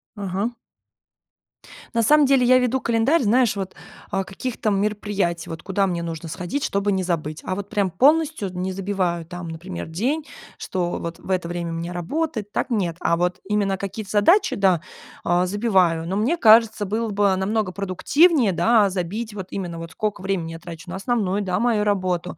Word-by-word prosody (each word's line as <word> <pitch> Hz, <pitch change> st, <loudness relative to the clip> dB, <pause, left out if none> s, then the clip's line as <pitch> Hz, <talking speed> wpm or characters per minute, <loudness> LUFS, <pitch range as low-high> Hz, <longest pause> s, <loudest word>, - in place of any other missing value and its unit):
Ага. 200 Hz, +3 st, -2 dB, 1.4 s
На 230 Hz, -, +3 dB
самом 295 Hz, +6 st, +5 dB
деле 270 Hz, -2 st, +4 dB
я 255 Hz, +1 st, +6 dB
веду 255 Hz, +1 st, +1 dB
календарь, 235 Hz, +8 st, +2 dB
знаешь, 240 Hz, 0 st, +3 dB
вот, 190 Hz, -1 st, -5 dB, 0.3 s
а, 195 Hz, 0 st, -1 dB
каких-то 215 Hz, +3 st, -3 dB
мероприятий, 200 Hz, -3 st, -1 dB
вот 165 Hz, 0 st, -6 dB
куда 195 Hz, +1 st, 0 dB
мне 175 Hz, -3 st, -2 dB
нужно 165 Hz, -1 st, -5 dB
сходить, 180 Hz, -, -4 dB
чтобы 200 Hz, -7 st, 0 dB
не 190 Hz, -1 st, 0 dB
забыть. 155 Hz, -3 st, -3 dB
А -, -, -2 dB
вот 200 Hz, +1 st, -5 dB
прям 200 Hz, -3 st, 0 dB
полностью 285 Hz, -, +3 dB
не 180 Hz, +1 st, -3 dB
забиваю, 185 Hz, -4 st, -2 dB
там, 175 Hz, 0 st, -7 dB
например, 170 Hz, +2 st, -6 dB
день, 255 Hz, -, -1 dB, 0.3 s
что 175 Hz, -2 st, -2 dB
вот 170 Hz, 0 st, -6 dB
в -, -, -13 dB
это 180 Hz, -2 st, 0 dB
время 175 Hz, 0 st, -4 dB
у 165 Hz, -, -4 dB
меня 170 Hz, +1 st, -4 dB
работает, 220 Hz, -, -3 dB
так 250 Hz, -, -2 dB
нет. 185 Hz, -7 st, 0 dB
А 170 Hz, -, +2 dB
вот 180 Hz, +1 st, -1 dB
именно 200 Hz, -1 st, 0 dB
какие-то 200 Hz, +1 st, -6 dB
задачи, 215 Hz, -, +4 dB
да, 185 Hz, -4 st, +3 dB, 0.4 s
а, 175 Hz, +1 st, +2 dB
забиваю, 185 Hz, -5 st, +2 dB
но 190 Hz, -, -2 dB
мне 230 Hz, +11 st, +1 dB
кажется, 220 Hz, -6 st, +5 dB
было 220 Hz, +3 st, -2 dB
бы 200 Hz, -1 st, +2 dB
намного 200 Hz, +1 st, -1 dB
продуктивнее, 215 Hz, -, +3 dB
да, 210 Hz, +4 st, +4 dB
забить 200 Hz, +4 st, -4 dB
вот 190 Hz, -3 st, -6 dB
именно 175 Hz, -4 st, -4 dB
вот 165 Hz, 0 st, -7 dB
сколько 210 Hz, -4 st, -3 dB
времени 185 Hz, -4 st, -2 dB
я 165 Hz, -, -8 dB
трачу 170 Hz, +1 st, -10 dB
на 180 Hz, -, -5 dB
основную, 200 Hz, -1 st, 0 dB
да, 185 Hz, 0 st, -1 dB
мою 225 Hz, -2 st, +2 dB
работу, 185 Hz, -4 st, -1 dB
195 Hz, 180 wpm, -23 LUFS, 180-220 Hz, 1.4 s, я